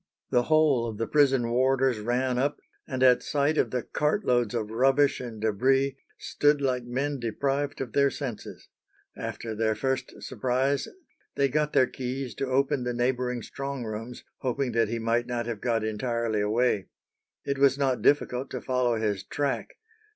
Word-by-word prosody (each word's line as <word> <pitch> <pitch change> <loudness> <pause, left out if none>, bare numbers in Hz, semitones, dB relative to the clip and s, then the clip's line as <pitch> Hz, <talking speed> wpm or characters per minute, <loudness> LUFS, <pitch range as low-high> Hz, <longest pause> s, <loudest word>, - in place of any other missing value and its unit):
The 125 - +3
whole 150 -7 +3
of 110 - -7
the 115 - -1
prison 135 -4 +3
warders 130 -1 +2
ran 125 +3 0
up, 140 +2 0 0.3
and 130 -3 -1
at 125 -1 +6
sight 145 +2 +1
of - - +2
the 125 -2 -2
cart 150 +8 -1
loads 120 -2 +1
of 110 -2 -2
rubbish 135 +4 +3
and 120 -4 -7
débris 130 +6 +2 0.2
"stood 145 0 +2
like 130 -3 0
men 135 +4 -2
deprived 135 +5 -2
of 125 -4 -5
their 140 0 +4
senses." 130 -6 -7 0.5
After 115 -1 -5
their 110 0 0
first 130 0 -3
surprise 130 +3 0 0.5
they 140 -1 +2
got 150 +2 0
their 130 - +5
keys 130 0 -5
to 135 - -2
open 135 0 +1
the 125 -1 -2
neighbouring 125 -1 -1
strong 140 -2 -5
rooms, 115 +3 -6 0.2
hoping 130 0 -1
that 115 -1 +2
he 115 - -2
might 115 +1 0
not 120 -1 -2
have 115 -3 -5
got 115 -3 0
entirely 110 0 -1
away. 105 -1 +1 0.6
It 140 -1 -2
was 140 -1 +4
not 135 -3 0
difficult 135 -2 +2
to - - -4
follow 125 -2 +1
his 105 -3 -1
track. 145 -2 -3
125 Hz, 170 wpm, -27 LUFS, 115-135 Hz, 0.6 s, at